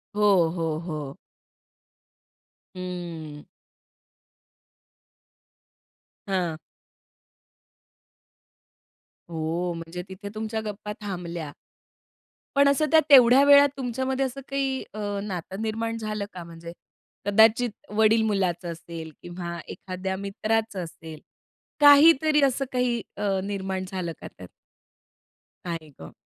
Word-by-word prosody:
हो, 195 -6 +4
हो, 165 -2 -1
हो. 155 -5 -6 1.6
हं. 170 -5 -6 2.9
हां 175 -4 -1 2.7
हो, 165 +2 -2
म्हणजे 165 +2 -6
तिथे 200 +2 -8
तुमच्या 220 0 -3
गप्पा 210 0 -5
थांबल्या. 175 -6 -5 1.0
पण 280 0 +5
असं 295 +2 +2
त्या 320 - +7
तेवढ्या 260 0 +8
वेळात 285 0 +8
तुमच्यामध्ये 260 +1 -1
असं 270 +2 -5
काही 270 -1 -1
अ, 215 - -7 0.2
नातं 190 +1 -5
निर्माण 225 +1 -2
झालं 215 -2 -3
का? 180 -2 -7
म्हणजे 170 0 -10 0.5
कदाचित 220 +4 +5 0.2
वडील-मुलाचं 210 -5 +2
असेल 165 -1 -8
किंवा 175 -1 -6
एखाद्या 190 0 -5
मित्राचं 200 0 -2
असेल, 160 -1 -10 0.6
काहीतरी 295 +1 +7
असं 275 0 +2
काही 250 -2 0 0.2
अ, 200 -2 0
निर्माण 190 -2 -3
झालं 180 -3 -3
का - - -7
त्यात? 90 - -12 1.2
काय 165 -3 -5
गं. 80 - -10
195 Hz, 95 wpm, -25 LUFS, 170-230 Hz, 2.9 s, तेवढ्या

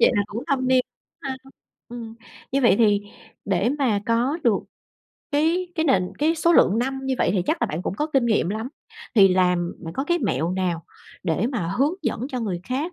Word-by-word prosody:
Vậy - - +6
là 205 - +3
cũng 230 +5 -6
thâm 260 -4 0
niên 255 -1 +4 0.4
ha. 265 -1 -3 0.5
Ừm, 230 -2 -8 0.4
như 275 - +2
vậy 235 - +5
thì 205 -3 +4 0.4
để 195 +3 +1
mà 225 -7 +2
có 240 +7 +1
được 225 -5 +4 0.7
cái 325 +5 +1
cái 320 -1 0
nền 185 - +2
cái 315 +3 +2
số 335 +1 +3
lượng 220 - +5
năm 265 +2 -1
như 265 - 0
vậy - - +2
thì 185 -3 +1
chắc - - 0
là - - +3
bạn 160 +4 -4
cũng - - -3
có 300 +9 -1
kinh 265 -3 +3
nghiệm 215 -6 +2
lắm. 220 +4 -3 0.5
Thì 195 -4 +7
làm 180 -1 +2
bạn 165 - -6
có 270 - -1
cái 345 +2 +1
mẹo 175 - 0
nào 180 -3 -2 0.4
để 180 +4 0
mà 190 -9 -2
hướng 290 +5 +2
dẫn 255 - -2
cho 255 -4 -3
người 190 -6 -3
khác 285 - -2
235 Hz, 215 wpm, -23 LUFS, 195-270 Hz, 0.7 s, Thì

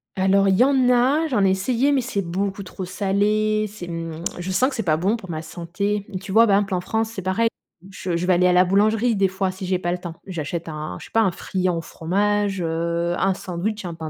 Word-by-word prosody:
Alors, 195 +1 +3
il 190 - +4
y - - +6
en 265 -2 +3
a, 260 +6 +3
j'en 240 -9 +2
ai 190 - +4
essayé, 240 +8 +1
mais 270 - +2
c'est 230 -5 -2
beaucoup 195 +3 -3
trop 185 0 -7
salé. 210 +3 +1
C'est, 195 -4 -9
mmh, 165 -1 -5 0.2
je 180 +2 -4
sens 225 +8 +3
que 275 - -6
c'est 225 - -2
pas 155 -4 +2
bon 195 +7 +1
pour 195 -6 -9
ma 155 -2 -3
santé. 195 +5 -3 0.2
Tu 195 0 -7
vois? 225 +3 +6
Par 200 -3 +4
exemple 200 -1 -1
en 180 - 0
France, 220 +3 -1
c'est 215 -4 -6
pareil, 190 +5 +1 0.4
je 180 -2 -3
je 175 - -2
vais 185 - +5
aller 180 +1 +4
à - - +4
la 180 +1 +5
boulangerie, 215 +4 +2
des 195 -1 +2
fois, 190 0 -1
si 185 0 -7
j'ai 185 0 0
pas 175 -1 -1
le - - -2
temps, 175 -2 -8
j'achète 170 -1 -4
un, 150 - -5
je - - -10
sais - - -16
pas, 225 - +3
un 195 -5 +2
friand 185 -1 -2
au - - -2
fromage, 200 +4 -1
heu, 170 +1 -1
un 195 0 +2
sandwich, 190 +3 -4
un 170 - -4
pain 160 -1 -6
190 Hz, 255 wpm, -22 LUFS, 175-210 Hz, 0.4 s, y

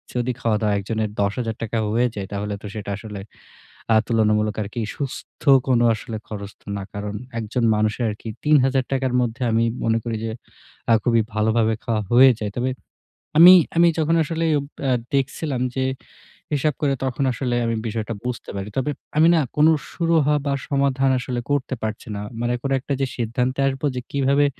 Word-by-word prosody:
যদি 125 +1 0
খাওয়া-দাওয়া 105 -2 +1
একজনের 110 +2 -2
১০,০০০ 110 +3 -1
টাকায়ও 110 -1 -1
হয়ে 120 +1 +3
যায় 100 -2 -4
তাহলে 100 +1 -3
তো - - -10
সেটা 105 -2 -6
আসলে 105 -2 -8 0.7
আ - - +5
তুলনামূলক 110 -2 +2
আরকি 110 +3 -4
সুস্থ 140 -3 -6 0.3
কোন 125 -3 +3 0.2
আসলে 110 +1 -6
খরচ 100 -2 -6
তো - - -30
না। 100 - -5
কারণ 105 0 -5 0.2
একজন 115 +2 -2
মানুষের 110 +3 0
আরকি 105 +2 -6 0.2
৩,০০০ 135 -3 +4
টাকার 130 -1 0
মধ্যে 120 +1 -2
আমি 115 +1 +3 0.2
মনে 115 0 +2
করি 115 -2 -3
যে 110 - -2 0.6
আ - - +7
খুবই 115 -2 +3
ভালোভাবে 110 +1 +2
খাওয়া 110 -2 0
হয়ে 130 +2 +8
যায়। 105 -2 -3
তবে 125 +2 0 0.7
আমি, 175 +3 +11 0.2
আমি 170 0 +6
যখন 160 +1 +2
আসলে 165 +1 -2
ওব 140 - -5 0.2
আ - - +3 0.2
দেখছিলাম 135 0 -1
যে 130 -1 0 0.7
হিসাব 145 0 +1
করে 140 -2 +2
তখন 130 +1 -1
আসলে 125 -1 -2
আমি 115 0 0
বিষয়টা 110 +1 -3
বুঝতে 125 -1 -4
পারি। 100 +1 -4
তবে 135 +3 0 0.3
আমি 160 +2 +6
না - - +4 0.2
কোনো 155 +2 +6 0.2
সুরহা 160 -4 +2
বা 140 - +1 0.2
সমাধান 135 -1 +2
আসলে 125 -1 -3
করতে 140 -2 0
পারছি 110 0 -4
না। 100 - -4 0.2
মানে 120 0 0
কোন 135 - -2
একটা 140 +2 -3
যে - - +3
সিদ্ধান্তে 125 +3 -1
আসবো 135 +1 -2
যে 125 - -2
কিভাবে 140 +1 +3
120 Hz, 180 wpm, -22 LUFS, 110-135 Hz, 0.7 s, আমি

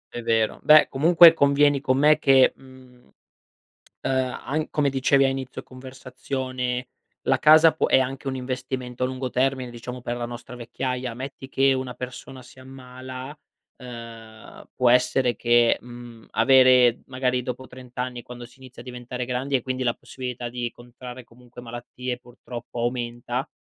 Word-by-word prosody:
È 120 - -4
vero. 115 -1 0
Beh 155 0 +6
comunque 165 +4 +7
convieni 140 -2 +3
con 130 -1 +1
me 150 +2 +4
che, 135 -3 +5
mhmm, 130 - -18 0.9
ehm, 130 -1 -1
an 155 +2 -2
come 145 -2 +1
dicevi 135 +1 +2
a 135 - +3
inizio 135 -1 -5
conversazione 130 -1 -5 0.3
la - - +1
casa 155 +1 +7
può 155 - -1
è - - +4
anche 135 +1 -4
un 135 - -2
investimento 130 -1 -4
a - - +3
lungo 130 0 -4
termine, 130 0 -1
diciamo 125 +1 -8
per 120 0 -4
la 120 - -3
nostra 120 +1 -9
vecchiaia. 125 +1 -4
Metti 135 +2 -8
che 135 0 +2
una 130 -1 -2
persona 130 +1 -9
si 125 +1 -17
ammala, 130 +1 -9 0.4
ehm, 115 -3 -11
può 125 -1 +3
essere 125 0 +2
che, 120 -1 +3
mhmm, 120 -2 -12
avere 125 0 +5
magari 130 -1 -1
dopo 125 +1 -6
30 125 0 -14
anni, 125 -1 -4
quando 120 0 -10
si 125 +2 -19
inizia 130 -1 -13
a - - -16
diventare 125 0 -6
grandi 130 +3 -2
e 130 - +1
quindi 130 +1 -3
la 120 -2 +1
possibilità 125 -1 -7
di 120 0 -4
contrarre 125 +1 -11
comunque 120 +1 -15
malattie 120 +1 -6
purtroppo 120 -1 -9
aumenta, 120 +2 -3
125 Hz, 160 wpm, -24 LUFS, 120-130 Hz, 0.9 s, comunque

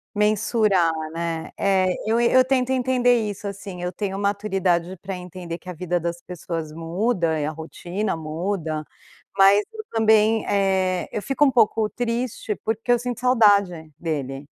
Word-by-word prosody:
Mensurar, 210 -4 +2 0.2
né. 165 -1 -4
É, 190 -2 +2 0.2
eu 225 +2 +2
e 235 - +3
eu 255 0 +6
tento 255 -1 +1
entender 245 -3 +2
isso, 205 0 -5
assim. 200 -2 -7
Eu 180 0 -2
tenho 195 +1 -4
maturidade 195 -3 0
pra 195 0 -5
entender 180 -1 -7
que 180 - -21
a 180 - -4
vida 175 +1 -2
das 170 +1 -4
pessoas 165 -3 -6
muda 165 0 -1
e 145 - -1
a 150 - -1
rotina 175 +6 -4
muda, 160 0 -3 0.5
mas 200 +1 +6
eu 435 - -7
também, 220 0 +3
eh, 190 -2 +1
eu - - -2
fico 270 +5 +1
um 275 - +5
pouco 220 -3 +3
triste, 235 -2 -3
porque 225 +2 -1
eu 240 - +4
sinto 245 -1 -4
saudade 200 -10 +3
dele. 140 -4 -4
195 Hz, 160 wpm, -23 LUFS, 170-220 Hz, 0.5 s, eu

